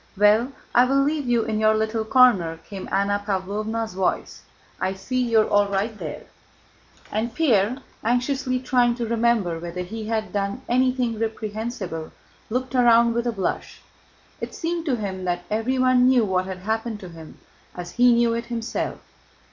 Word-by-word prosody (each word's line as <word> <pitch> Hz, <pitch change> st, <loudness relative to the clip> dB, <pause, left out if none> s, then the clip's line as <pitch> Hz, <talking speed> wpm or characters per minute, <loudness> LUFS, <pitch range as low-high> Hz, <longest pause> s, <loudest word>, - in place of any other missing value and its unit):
"Well, 210 Hz, +5 st, +4 dB, 0.2 s
I 245 Hz, +1 st, +6 dB
will 275 Hz, +2 st, +3 dB
leave 290 Hz, -1 st, -1 dB
you 240 Hz, -2 st, +2 dB
in 215 Hz, -1 st, -2 dB
your 215 Hz, 0 st, +4 dB
little 220 Hz, +1 st, 0 dB
corner," 220 Hz, -10 st, +4 dB
came 195 Hz, -2 st, -7 dB
Anna 205 Hz, +1 st, +1 dB
Pávlovna's 215 Hz, +3 st, -2 dB
voice, 185 Hz, -1 st, -2 dB, 0.4 s
"I 190 Hz, -, -1 dB
see 255 Hz, +7 st, -2 dB
you 230 Hz, -3 st, +4 dB
are -, -, 0 dB
all 205 Hz, 0 st, +3 dB
right 200 Hz, +3 st, -1 dB
there." -, -, -7 dB, 0.9 s
And 225 Hz, +2 st, -2 dB
Pierre, 240 Hz, -7 st, +2 dB, 0.3 s
anxiously 255 Hz, +2 st, 0 dB
trying 245 Hz, -2 st, +2 dB
to 240 Hz, -1 st, -3 dB
remember 225 Hz, -7 st, +1 dB
whether 175 Hz, +2 st, -5 dB
he 215 Hz, +4 st, -6 dB
had 220 Hz, -1 st, -2 dB
done 200 Hz, +5 st, -2 dB
anything 250 Hz, -2 st, +1 dB
reprehensible, 220 Hz, -6 st, -4 dB, 0.4 s
looked 255 Hz, +2 st, -2 dB
round 235 Hz, -2 st, +5 dB
with 235 Hz, +1 st, -1 dB
a -, -, +1 dB
blush. 195 Hz, -4 st, -4 dB, 0.6 s
It -, -, -6 dB
seemed 335 Hz, 0 st, -3 dB
to 265 Hz, -, +2 dB
him 195 Hz, -4 st, -4 dB
that 175 Hz, 0 st, -1 dB
everyone 255 Hz, +3 st, +3 dB
knew 255 Hz, -3 st, +4 dB
what 185 Hz, -2 st, 0 dB
had 185 Hz, 0 st, -7 dB
happened 220 Hz, 0 st, -2 dB
to 185 Hz, -, -8 dB
him 165 Hz, -2 st, -12 dB, 0.4 s
as 175 Hz, -1 st, -7 dB
he 245 Hz, 0 st, +5 dB
knew 235 Hz, -1 st, +3 dB
it 235 Hz, 0 st, -3 dB
himself. 235 Hz, -1 st, -3 dB
225 Hz, 165 wpm, -23 LUFS, 200-245 Hz, 0.9 s, I